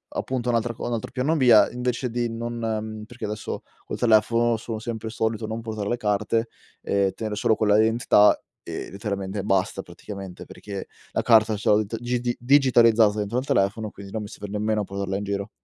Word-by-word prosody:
Appunto 125 -2 -2
un'altra 115 0 +1
co - - -7
un 120 - -2
altro 115 - -4
piano 140 +6 0
B 130 - +2
è 110 -2 +7
invece 125 0 -2
di 120 0 -1
non 120 +1 -4
mhmm, 110 -2 -3
perché 120 +2 -8
adesso 105 0 -4 0.2
col - - -5
telefono 115 +1 +3
sono 110 0 -5
sempre 110 -1 -5
solito 110 0 -2
non 110 +1 -4
portare 110 -3 -4
le 120 - 0
carte 105 +1 0 0.3
e 100 -1 +1
tenere 110 -2 -4
solo 110 +1 +2
quella 105 -1 +3
identità 110 -1 +5 0.3
e, - - -6
letteralmente 100 0 -4
basta, 95 -3 0
praticamente, 95 -3 -9
perché 100 -2 -8 0.2
la - - 0
carta 110 -2 +5
ce 105 - -1
l 105 +1 +4
t 115 - -4
gidi 120 0 -1
digitalizzata 120 -5 +5
dentro 105 +4 -2
al 130 - -5
telefono, 105 +1 +1
quindi 100 0 -11
non 110 - -3
mi - - -6
serve 105 - -8
nemmeno 105 +1 0
portarla 100 0 -3
in 100 - -4
giro. 100 0 -3
110 Hz, 195 wpm, -24 LUFS, 105-120 Hz, 0.3 s, è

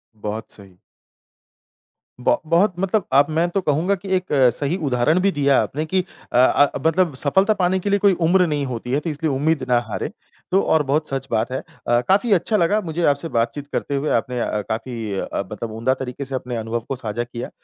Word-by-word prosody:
बहुत 105 +1 -6
सही। 95 -3 -13 1.4
ब - - +3
बहुत 175 +5 +3
मतलब 195 +2 0
अब 140 +1 +6
मैं 165 +3 +2
तो 195 +3 -1
कहूँगा 165 +5 +1
कि 195 +1 -10
एक 185 -1 -1 0.3
सही 145 +5 -1
उदाहरण 130 +7 +2
भी 195 +1 +3
दिया 140 -3 +3
आपने 155 +3 -3
कि 185 +3 0 0.3
अ, 120 - +1
अ, 140 +3 +5
मतलब 165 0 +2
सफलता 190 +11 +3
पाने 180 +1 +2
के 200 - -3
लिए 200 0 +2
कोई 200 -1 +4
उम्र 180 +1 +4
नहीं 145 -3 -1
होती 125 -1 -5
है, 140 - +2
तो 165 - -4
इसलिए 155 0 -2
उम्मीद 145 +1 0
ना 120 -1 +4
हारें। - - -3 0.4
तो 190 +2 +4
और 160 -1 +2
बहुत 150 +3 0
सच 135 0 -3
बात 115 +2 0
है। 130 - -2 0.3
अ, 120 0 +4
काफ़ी 200 +5 +3
अच्छा 195 +4 +2
लगा 190 +4 +2
मुझे 170 -2 -3
आपसे 145 +3 +1
बातचीत 120 +4 -1
करते 140 - -2
हुए। 140 +2 -1
आपने 125 -1 -5
अ, 105 -2 -1
काफ़ी 115 -2 -4
अ, - - -3
मतलब 110 +2 -5
उम्दा 115 +4 0
तरीके 130 +1 -6
से 135 0 -4
अपने 125 -1 -4
अनुभव 115 +1 -2
को 135 - -1
साझा 120 -1 -3
किया। 120 0 -7
145 Hz, 210 wpm, -21 LUFS, 125-175 Hz, 1.4 s, अब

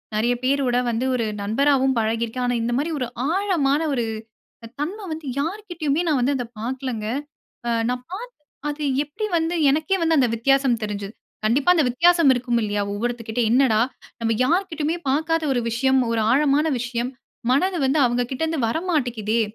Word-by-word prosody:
நிறையா 240 +3 +2
பேரோட 260 -2 +2
வந்து 235 +3 -1
ஒரு 230 - 0 0.2
நண்பராவும் 265 +4 +2
பழகிருக்கேன். 230 +2 -1
ஆனா 245 - +1
இந்த 240 +1 -1
மாரி 305 +5 -1
ஒரு 250 - -1 0.2
ஆழமான 340 -8 +1
ஒரு 240 -4 0 0.6
அ - - -8
தன்மை 395 +7 -4
வந்து, 315 -1 -8
யார்கிட்டயுமே 335 -3 -2
நான் 290 -4 +2
வந்து 275 +3 +2
அத 245 - -3 0.2
பாக்கலங்க! 250 -2 -3 0.6
அ - - +1 0.2
நான் 250 0 -3
பாத்து, 480 +6 -6 0.4
அது 295 +1 -4 0.2
எப்டி 365 +10 -4
வந்து 325 +1 -1 0.2
எனக்கே 315 +6 +1
வந்து 325 -1 +3
அந்த 250 -3 +4
வித்தியாசம் 265 0 +2
தெரிஞ்சது. 205 0 -5 0.3
கண்டிப்பா 265 +10 +3
அந்த 320 - +3
வித்தியாசம் 335 +2 +4
இருக்கும் 245 -1 0
இல்லையா? 205 -1 -1
ஒவ்வொருத்தர் 235 +2 -3
கிட்ட, 220 +2 -1
"என்னடா 240 -3 +4 0.4
நம்ம 225 0 +1
யார்கிட்டயுமே 325 -1 0
பாக்காத 320 +3 +1
ஒரு 245 - +1
விஷயம், 265 +3 +2
ஒரு 230 - +1
ஆழமான 290 +2 +3
விஷயம், 240 +1 -2 0.4
மனது 360 +7 +2
வந்து 270 +4 +2
அவுங்ககிட்டருந்து 250 +6 -1
வரமாட்டிக்குதே" 245 - 0
265 Hz, 155 wpm, -23 LUFS, 235-315 Hz, 0.6 s, அந்த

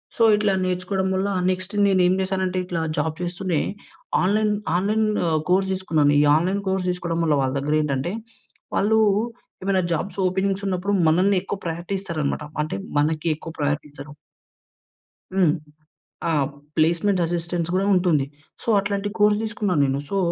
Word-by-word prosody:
So, 230 - +2
ఇట్లా 210 -2 +1
నేర్చుకోడం 185 +1 -1
వల్ల, 190 +2 0 0.2
next 185 +3 -3
నేను 190 -2 +3
ఏం 185 - +3
చేశానంటే 190 -1 -1
ఇట్లా 175 -2 -2 0.2
జాబ్ 155 +1 -1
జేస్తూనే 175 -2 -1 0.6
ఆన్‌లైన్ 210 +2 +2 0.2
ఆన్‌లైన్ 215 +4 +1 0.2
ఆహ్, 155 -1 +2
కోర్స్ 190 +1 +3
తీసుకున్నాను. 155 -6 +2
ఈ - - +5
ఆన్‌‌లైన్ 185 +5 +1
కోర్స్ 190 -1 0
తీసుకోవడం 175 -2 -2
వల్ల 155 -3 +3
వాళ్ళ 130 0 0
దెగ్గరేంటంటే, 150 +3 0 0.6
వాళ్ళు 220 +2 +3 0.6
ఏమైనా 195 -1 +2
జాబ్స్ 180 +4 -3
ఓపెనింగ్స్ 195 +2 -1
ఉన్నపుడు 190 +2 -1
మనల్ని 185 +5 +3
ఎక్కువ 200 - -4
ప్రయారిటీ 170 +3 -4
ఇస్తారనమాట. 155 -5 -2 0.2
అంటే 155 - -4 0.2
మనకి 155 +2 0
ఎక్కువ 165 +1 -9
ప్రయారిటీ 145 0 0
ఇస్తరు. 145 +1 -10 1.2
హ్మ్. 180 -5 +4 0.8
ఆహ్, 145 -2 +1 0.3
ప్లేస్మెంట్ 170 +4 +2
అసిస్టెన్స్ 170 0 -2
గూడా 195 +2 +1
ఉంటుంది. 170 -7 +2 0.4
సో, - - -12
అట్లాంటి 200 0 -2
కోర్స్ 210 0 +4
తీసుకున్నా 215 -4 -1
నేను. 135 +1 0
సో, 200 - 0
180 Hz, 145 wpm, -23 LUFS, 160-195 Hz, 1.2 s, ఈ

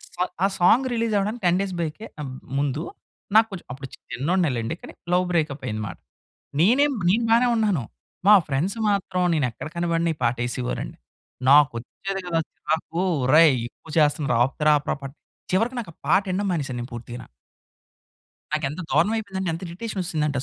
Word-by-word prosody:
Song 180 0 -2
ఆ - - +5
song 220 +8 +5
release 230 -1 0
అవ్వడానికి 210 +4 -1
10 175 0 +4
days 195 -2 -3
బ్యాకే 170 +7 -4
ఆహ్, 140 - -4 0.3
ముందు 140 +1 0 0.5
నాకు 220 0 +7
కొంచం 190 -3 -7
అప్పుడు 135 +1 -7 0.3
చిన్నోడినే 165 +5 +1
లెండి. 115 +6 -2
కానీ - - -10 0.2
లవ్ 180 +1 +3
బ్రేకప్ 155 -5 0
అయింది 110 -1 -3
మాట. - - -8 0.6
నేనేం 270 - +4 0.2
నేను 225 +6 +3
బానే 235 +2 +5
ఉన్నాను. 205 - +1 0.5
మా 210 - +10
ఫ్రెండ్స్ 150 +9 -1
మాత్రం 190 -2 0
నేనెక్కడ 125 -5 -2
కనపడని 170 -1 +1
ఈ - - -24
పాట 120 +1 +2
ఎసేవారండి. 125 0 -4 0.5
నాకు 145 -2 +7
వచ్చేది 195 +11 -5
కదా! 170 -2 0
చిరాకు. 160 +2 -2 0.2
ఒరేయ్! 150 +1 +6
ఎక్కువ 160 - -17
చేస్తున్నరు 150 -3 +2
ఆపుతార 135 +4 0
ఆపరా 145 - -3
పాట. 135 - -5 0.4
చివరకు 230 +7 +1
నాకు 210 -8 -8
ఆ - - -47
పాట 195 - +5
వినడం 195 +2 0
మానేసాను 135 -7 -2
నేను 120 - -7
పూర్తిగన. 120 +1 -8 1.3
నాకెంత 150 +1 -1
దారుణవయిపోయిందంటే, 190 +1 +1
ఎంత 165 - -5
ఇరిటేషనొచ్చేసిందంటే 170 -6 -2
170 Hz, 160 wpm, -24 LUFS, 140-195 Hz, 1.3 s, మా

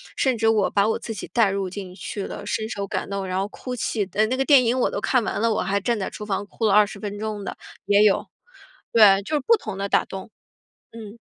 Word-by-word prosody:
甚 260 -3 +1
至 225 - +1
我 215 -3 +3
把 200 +1 +2
我 220 - +1
自 225 - -6
己 185 - -7
带 215 -3 +3
入 195 -1 -2
进 185 -1 -8
去 195 +2 -6
的， - - -7
深 220 0 -2
受 200 -3 -4
感 - - -3
动 195 -1 -3
然 185 0 -2
后 195 - 0
哭 250 +3 -6
泣 220 -3 -1
的 200 +3 -2
哎， - - +5
那 255 +3 -1
个 270 - 0
电 275 -4 +6
影 250 +3 +1
我 - - +2
都 - - -4
看 255 -3 +2
完 - - -2
了， 230 -1 +2
我 - - 0
还 200 +1 -1
站 235 0 0
在 190 - -3
厨 210 - -8
房 205 0 -2
哭 225 - -3
了 200 - +3
20 210 -1 +4
分 205 0 -5
钟 215 -1 -4
的， - - -6 0.3
也 205 +1 +4
有。 205 - +3 0.7
对， 200 -3 +7
就 305 - -2
是 290 - +1
不 460 -1 +5
同 215 - -7
的 200 0 -3
打 - - +3
动。 195 +3 -8 0.6
嗯。 225 0 -10
210 Hz, 280 characters per minute, -23 LUFS, 200-230 Hz, 0.7 s, 对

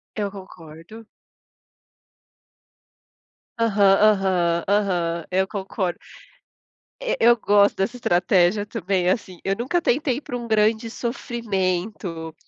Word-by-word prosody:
Eu 205 -2 -2
concordo. 185 +2 -12 2.5
Aham. 220 -3 +1 0.2
Aham. 185 -5 +2
Aham. 175 -5 0
Eu 190 +1 +1
concord 190 -2 -3 1.1
Eh, - - -1
eu 240 +1 +6
gosto 205 -3 +3
dessa 215 +6 -1
estratégia 180 -1 +2
também, 190 -4 -1
assim, 185 -2 -2
eu 195 0 -1
nunca 260 - -1
tentei 270 -3 0
ir - - -5
para 250 -4 -6
um 240 - -6
grande 220 +1 +1
sofrimento, 190 - -3
200 Hz, 105 wpm, -22 LUFS, 180-225 Hz, 2.5 s, eu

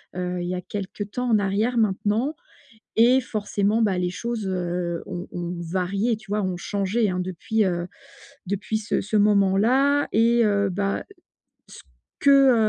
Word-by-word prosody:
heu, 180 0 -3
il - - -3
y - - -1
a - - -3
quelque 195 +1 -5
temps 245 +5 -3
en 220 -2 +4
arrière 205 +5 0
maintenant 220 +6 +1 0.6
et 245 +3 +6
forcément, 210 -1 -1
bah, 200 -4 +2
les 180 0 0
choses, 230 +2 -4
heu, 175 -2 -2
ont 180 -1 -6
ont 175 0 -4
varié 190 +6 -1
tu 215 -2 -16
vois? 210 0 +1
Ont 185 -2 -2
changé 205 +4 0
hein, 180 - -2
depuis, 185 +5 -1
heu, 175 -1 -2 0.6
depuis 200 +3 -2
ce 210 - -1
ce 210 +2 -4
moment-là, 210 +8 +3
et 235 +2 +4
heu, 200 -1 +2
bah, 195 +2 -2 0.6
ce - - -13 0.4
que, 275 -2 +6
205 Hz, 160 wpm, -24 LUFS, 185-225 Hz, 0.6 s, et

